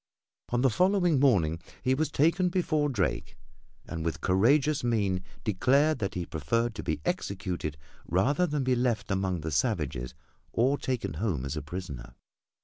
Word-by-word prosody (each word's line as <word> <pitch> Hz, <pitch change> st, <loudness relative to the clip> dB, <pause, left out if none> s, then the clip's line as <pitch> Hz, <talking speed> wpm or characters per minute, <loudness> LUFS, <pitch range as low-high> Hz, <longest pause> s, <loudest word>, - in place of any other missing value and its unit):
On 120 Hz, 0 st, +1 dB
the 135 Hz, -1 st, +4 dB
following 180 Hz, -, +3 dB
morning 90 Hz, -, +3 dB, 0.2 s
he 130 Hz, -, +3 dB
was 155 Hz, +4 st, 0 dB
taken 165 Hz, +5 st, +2 dB
before 155 Hz, -5 st, +1 dB
Drake 130 Hz, -, -2 dB, 0.5 s
and 85 Hz, -2 st, -5 dB
with 85 Hz, 0 st, -2 dB
courageous 135 Hz, +11 st, +3 dB
mien 100 Hz, -6 st, +1 dB, 0.2 s
declared 135 Hz, +9 st, +2 dB
that 100 Hz, -, -3 dB
he 90 Hz, -1 st, -2 dB
preferred 110 Hz, +11 st, -1 dB
to -, -, -5 dB
be -, -, -2 dB
executed 95 Hz, -, -3 dB, 0.3 s
rather 135 Hz, -, +2 dB
than 145 Hz, -3 st, -1 dB
be 130 Hz, 0 st, +2 dB
left 120 Hz, -4 st, 0 dB
among 95 Hz, -3 st, 0 dB
the 80 Hz, +1 st, -4 dB
savages 65 Hz, -3 st, -1 dB, 0.4 s
or 130 Hz, +5 st, +2 dB
taken 130 Hz, -3 st, -2 dB
home 85 Hz, -, -1 dB
as 70 Hz, +2 st, -3 dB
a 75 Hz, -, -3 dB
prisoner. 70 Hz, -7 st, -7 dB
115 Hz, 155 wpm, -29 LUFS, 90-145 Hz, 0.5 s, the